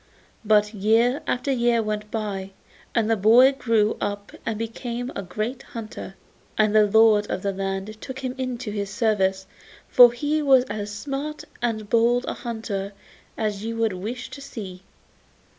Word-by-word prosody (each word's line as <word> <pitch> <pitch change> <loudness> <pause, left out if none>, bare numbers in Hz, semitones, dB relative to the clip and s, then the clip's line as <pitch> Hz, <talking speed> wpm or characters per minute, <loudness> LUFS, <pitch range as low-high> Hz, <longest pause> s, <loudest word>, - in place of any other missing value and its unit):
But 210 0 +3
year 225 +6 +2
after 250 +3 0
year 240 -2 +2
went 210 0 -3
by, 195 -3 -4 0.4
and 225 -2 +2
the 225 - +3
boy 230 +6 +6
grew 230 -5 +1
up 205 0 -3 0.2
and 225 -2 -1
became 235 +2 -4
a - - -3
great 215 +7 -4
hunter, 215 -4 -8 0.4
and 215 -1 +3
the 210 -1 +6
lord 215 0 +5
of 185 - -3
the 200 - 0
land 195 +2 -4
took 260 -1 -7
him 260 -2 -3
into 250 -3 -3
his 200 -1 -3
service, 195 -3 +1 0.4
for 245 -1 +8
he 295 +5 -1
was 265 -3 +5
as 210 -4 -5
smart 280 +7 -5 0.2
and 220 -3 -2
bold 235 +3 +3
a - - -1
hunter 210 -4 -5 0.4
as 210 -2 -2
you 230 +1 -4
would 225 -3 +1
wish 225 +7 -6
to 280 - -9
see. 205 -10 -8
220 Hz, 160 wpm, -24 LUFS, 205-245 Hz, 0.4 s, for